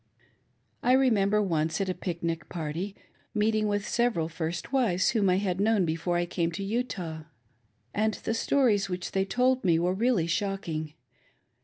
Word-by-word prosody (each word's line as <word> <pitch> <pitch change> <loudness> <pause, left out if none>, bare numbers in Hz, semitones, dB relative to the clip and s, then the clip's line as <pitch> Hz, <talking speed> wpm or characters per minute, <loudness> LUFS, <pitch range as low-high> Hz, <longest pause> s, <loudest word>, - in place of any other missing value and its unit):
1 250 +1 +4
retnembei 210 -5 +3
once, 160 -2 0
at 195 - 0
a 185 - 0
pic 175 -2 -5
nic 165 -2 -2
party, 170 +4 -4 0.4
meeting 215 0 +2
With 205 0 -1
several 230 -10 +1
first 165 +7 -4
wives 210 -9 +2
whom 210 -5 +2
I 180 - +4
had 190 -1 -1
known 210 -3 +3
before 165 +2 -1
I 175 - +1
came 170 -1 -1
to 195 - -4
Utah, 195 -8 -3 0.7
and 215 0 +1
the 225 - -3
Stories 225 -5 +2
which 180 -1 -4
they 195 0 +1
told 250 +5 +2
me 170 -4 +4
were 175 +2 +1
really 220 -3 +2
shocking. 170 -5 -2
195 Hz, 165 wpm, -28 LUFS, 170-215 Hz, 0.7 s, 1